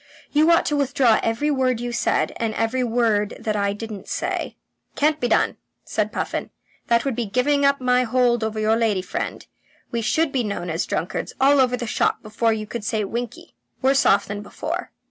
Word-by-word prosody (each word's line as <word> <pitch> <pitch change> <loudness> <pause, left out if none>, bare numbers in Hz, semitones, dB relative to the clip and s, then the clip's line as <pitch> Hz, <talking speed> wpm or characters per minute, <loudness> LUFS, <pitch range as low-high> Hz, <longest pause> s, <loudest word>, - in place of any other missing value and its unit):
You 305 +2 +4
ought 335 - +5
to 295 - 0
withdraw 265 -5 +3
every 235 +7 0
word 255 -4 +1
you 240 0 -3
said, 240 - 0
and 225 -1 -2
I - - -5
every 235 +3 0
word 225 -3 +1
that 220 -2 -2
I 200 -1 +1
didn't 210 -1 -7
say." - - -3 0.4
"Can't 305 +1 +2
be 245 - 0
done," - - +2 0.3
said - - -1
Puffin. - - -3 0.4
"That 235 +1 +2
would 270 -4 -1
be 235 -2 -2
giving 280 +6 +2
up 280 0 +3
my 250 -1 +3
hold 245 -1 +2
over 220 0 -2
your 215 +1 +3
lady 220 -5 +1
friend. - - -4 0.5
We 235 - -1
should 315 +7 +1
be 260 -3 0
known 200 -5 -3
as 165 +2 -2
drunkards - - -3
all 275 +1 +5
over 250 -1 +2
the 240 - -4
shop 220 - 0
before 215 +2 0
you 215 -1 -2
could 225 +1 -6
say 215 0 -1
winkie. 235 +4 -5 0.3
Worse 270 +1 +4
off 200 +1 +4
than 205 0 -5
before." 205 - -5
235 Hz, 205 wpm, -22 LUFS, 215-260 Hz, 0.5 s, ought